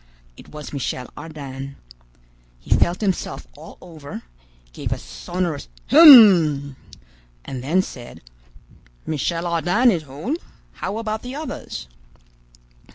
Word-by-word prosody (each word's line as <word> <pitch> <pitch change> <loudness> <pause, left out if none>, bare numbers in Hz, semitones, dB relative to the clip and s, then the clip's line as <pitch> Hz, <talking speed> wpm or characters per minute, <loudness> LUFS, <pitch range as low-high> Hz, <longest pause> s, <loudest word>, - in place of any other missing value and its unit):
It - - -15
was 150 -1 -9
Michel 125 -2 -4
Ardan. 140 -3 -8 0.8
He - - +1
felt 175 +4 +1
himself 195 - -2
all - - -13
over, 150 -8 -10 0.5
gave - - -5
a - - -1
sonorous 175 -4 -5 0.2
"Hem!" 190 - +8 0.7
and 130 -2 -6
then 175 +7 +2
said: 120 -8 -11 0.8
"Michel 165 +3 -2
Ardan 175 +9 +2
is 175 -5 -1
whole. 155 - -5 0.3
How 205 - -5
about 220 -1 -3
the 250 +2 -7
others?" 285 - -7
165 Hz, 110 wpm, -21 LUFS, 140-205 Hz, 0.8 s, Hem